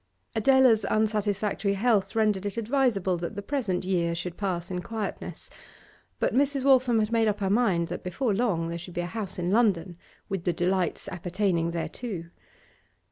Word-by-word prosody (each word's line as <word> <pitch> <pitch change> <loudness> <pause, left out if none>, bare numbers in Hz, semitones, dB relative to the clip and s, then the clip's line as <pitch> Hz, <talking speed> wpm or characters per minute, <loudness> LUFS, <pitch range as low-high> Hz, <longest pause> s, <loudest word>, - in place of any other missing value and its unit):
Adela's 250 -1 +5
unsatisfactory 210 -2 0
health 215 0 +1
rendered 210 -3 +2
it 205 - -6
advisable 225 -6 +1
that 170 +5 -5
the 205 - -4
present 200 -9 -1
year 170 -3 0
should 175 +1 -5
pass 185 -2 -3
in 180 -1 -2
quietness, 220 +1 -5 0.7
but - - 0
Mrs. 275 0 +2
Waltham 260 -3 +4
had 215 0 +1
made 225 -1 +3
up 210 -1 0
her 195 -1 0
mind 195 -7 +2
that - - -4
before 205 +6 -1
long 195 -7 0
there 170 0 -4
should 175 +1 -10
be 175 - 0
a - - -3
house 200 +1 -5
in 175 0 -1
London, 195 -6 +2 0.3
with 195 -3 -3
the 175 - +1
delights 180 +1 0
appertaining 180 -1 -1
thereto. 170 0 -5
200 Hz, 170 wpm, -27 LUFS, 180-225 Hz, 0.7 s, Adela's